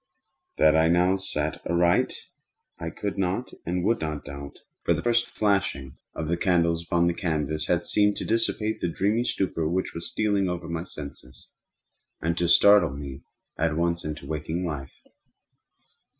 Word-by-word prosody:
That 80 0 +5
I 80 0 +5
now 90 +3 +4
saw 80 -5 -1 0.2
aright 85 0 +3 0.6
I 80 - -3
could 100 +3 -4
not 95 +6 -1
and 90 +1 -1
would 115 +4 +1
not 75 -2 -3
doubt; 70 0 -8 0.3
for 85 - +3
the 80 - -4
first 120 0 +2
flashing 85 -11 0 0.2
of 80 - -3
the 85 +2 0
candles 85 -2 +2
upon 85 0 +2
that 85 +2 0
canvas 80 -4 -1
had 85 -1 +1
seemed 105 +2 +2
to - - -4
dissipate 110 -1 0
the - - -1
dreamy 105 +7 +1
stupor 85 -8 -1
which 95 +2 -1
was 85 - -5
stealing 100 -3 +1
over 90 -1 -4
my 85 +1 -3
senses, 70 -6 -10 0.7
and 85 +1 0
to 85 -1 +1
startle 85 -4 +6
me 70 -1 -7 0.4
at 80 -1 +1
once 85 0 0
into 75 -2 -5
waking 80 +4 -3
life. 70 -5 -6
85 Hz, 165 wpm, -26 LUFS, 80-95 Hz, 0.7 s, startle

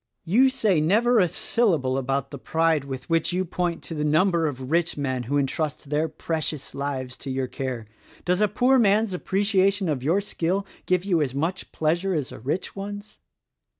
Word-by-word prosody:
"You 240 +10 +5
say 215 - +2
never 225 +9 +3
a 180 - +4
syllable 165 - +1
about 135 +1 -1
the 140 - -7
pride 160 -1 +1
with 130 -2 -6
which 165 0 +1
you 185 +1 0
point 175 -1 -2
to - - -5
the 150 -1 -2
number 160 +2 +3
of 130 -1 -5
rich 170 -1 +1
men 130 -3 -1
who 145 - +2
entrust 145 +1 -2
their 155 +2 +1
precious 155 -2 -4
lives 135 -2 -4
to 140 - -8
your 130 0 -1
care. 125 -3 -4 0.4
Does 180 +2 +1
a 210 - +5
poor 250 +6 +3
man's 210 -1 +3
appreciation 195 +1 +1
of 145 -5 -1
your 165 +9 +2
skill 195 -1 -1 0.2
give 180 0 +1
you 175 -5 +2
as 135 -3 -1
much 165 +6 -2
pleasure 170 +4 0
as 145 -4 -2
a - - -9
rich 145 +10 -3
one's? 205 +1 -7
165 Hz, 185 wpm, -25 LUFS, 140-195 Hz, 0.4 s, You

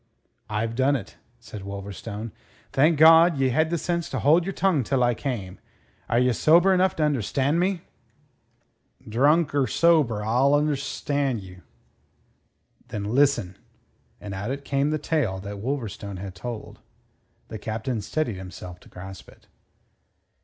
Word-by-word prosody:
"I've 110 +2 -2
done 135 +4 +2
it," 105 -6 -6 0.2
said 110 -3 -9
Wolverstone. 100 +3 -7 0.4
"Thank 150 +4 +4
God, 165 +1 +7
ye 135 -1 +2
had 155 +6 +1
the 170 - 0
sense 170 0 -2
to - - -3
hold 160 +4 +4
your - - -1
tongue 180 -7 +1
till 125 +2 +1
I 120 0 +3
came. 115 -8 -5 0.5
Are 115 - +2
ye 125 0 +3
sober 170 - +5
enough 185 +1 +2
to 155 - 0
understand 140 +2 +1
me?" 185 -1 0 1.3
"Drunk 145 +9 +3
or 140 -2 +2
sober, 140 -7 +3
allus 135 +7 +3
'derstand 135 -4 -2
you." 90 -1 -13 1.3
"Then 105 - -5
listen." 135 -9 +2 0.6
And 105 -1 -7
out 125 +9 -4
came 140 +1 +1
the 155 - 0
tale 145 -10 -1
that 100 0 -7
Wolverstone 110 -5 -4
had 95 0 -7
told. 120 +1 -7 0.7
The 110 - -6
Captain 110 +2 -3
steadied 115 0 -2
himself 90 -1 -9
to - - -18
grasp 95 0 -10
it. - - -20
130 Hz, 145 wpm, -25 LUFS, 105-150 Hz, 1.3 s, God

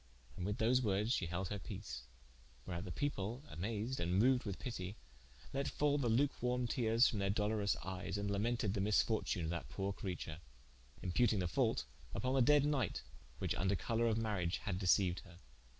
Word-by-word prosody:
And 90 - -3
with 105 - -1
those 125 +3 +3
wordes 105 +1 +1
she 90 - 0
held 90 +2 -2
her 105 - -3
peace: 65 -7 -7 0.6
wherat 90 0 -4
the - - -5
people 125 -3 -2
amased, 110 +8 -2
and 90 +2 +1
moued 125 +2 +4
with 100 -3 -3
pitie, 100 -5 -5 0.6
let 140 +1 0
fall 145 0 +1
the 125 -4 +1
luke 135 +5 +2
warme 125 0 +1
teares 115 0 +4
from 105 - -1
their 100 0 +1
dolourouse 105 0 +1
eyes 95 +1 -3
and 100 0 -1
lamented 105 0 0
the 100 - 0
misfortune 105 -2 +2
of 80 - -1
that 80 -8 -4
poore 95 +7 -2
creature: 90 -5 -5 0.6
imputing 105 +5 +3
the 90 -2 +1
fault 85 - +1 0.3
vppon 125 +6 0
the 135 - +4
dead 145 +3 +5
knight, 135 -9 0 0.3
which - - -1
vnder 95 +1 +1
colour 115 +6 +1
of 110 -1 +2
mariage 100 -6 0
had 95 -3 -3
deceiued 90 -1 +3
her. 90 -3 -14
105 Hz, 185 wpm, -37 LUFS, 95-120 Hz, 0.6 s, dead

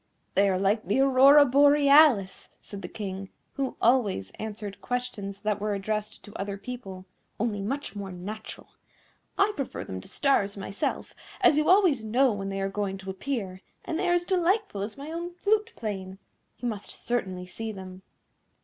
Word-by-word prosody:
"They 200 0 +4
are 185 - +1
like 200 +1 +1
the 205 - +2
Aurora 275 +2 +7
Borealis," 280 -5 +5
said 200 -1 -9
the - - -6
King, 195 -2 -6 0.2
who 270 -1 -3
always 215 - +2
answered 210 -2 -6
questions 210 -6 -4
that 210 -1 -1
were 210 -1 0
addressed 215 +2 -3
to 205 - -12
other 200 0 -4
people, 195 -4 -8 0.3
"only 210 -2 -1
much 245 +1 -4
more 200 -2 -5
natural. 205 +5 -8 0.7
I 400 +2 +3
prefer 275 - -4
them 95 0 -6
to - - -13
stars 205 -8 +1
myself, 195 +1 -3 0.3
as - - +6
you 305 - +1
always 360 - +5
know 245 +3 +3
when 195 -1 -4
they 195 0 -3
are 195 - 0
going 195 -1 -3
to 190 0 -6
appear, 190 -3 -4 0.2
and 325 - -2
they 370 -2 +1
are - - +4
as 350 0 0
delightful 370 - +1
as 210 +5 -5
my 285 +3 -7
own 345 +1 -5
flute 430 +4 +1
playing. 195 -4 -5 0.4
You 245 - -4
must 210 -4 -4
certainly 190 -7 -3
see 220 +5 -6
them." 190 -2 -9
215 Hz, 175 wpm, -27 LUFS, 195-275 Hz, 0.7 s, Aurora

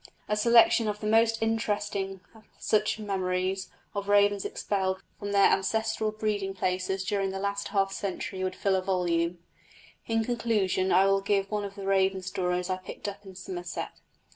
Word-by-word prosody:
A 210 - +1
selection 230 +1 +5
of 210 0 -2
the 215 - -6
most 225 +1 +3
interesting 205 -3 -1
of 220 -1 -18
such 215 0 +1
memories 190 -2 -2 0.2
of 200 0 -4
ravens 205 -1 +4
expelled 190 -2 -2 0.2
from 205 0 -4
their 200 -1 +5
ancestral 220 +2 0
breeding 210 -3 -2
places 185 +1 -1
during 195 0 0
the 190 - -4
last 200 +1 -2
half 195 -1 +1
century 190 -1 -4
would 185 0 -2
fill 195 0 +1
a 190 - +1
volume. 175 -2 0 0.7
In 225 -1 +1
conclusion 215 -6 0
I 190 +2 +5
will 195 0 +3
give 195 0 0
one 210 -1 -1
of 200 0 -8
the 200 -1 -7
raven 190 -1 +2
stories 180 -1 -1
I 185 -1 -1
picked 185 +2 -8
up 200 0 -7
in 190 - -11
Somerset. 180 -1 -6
195 Hz, 170 wpm, -28 LUFS, 190-210 Hz, 0.7 s, selection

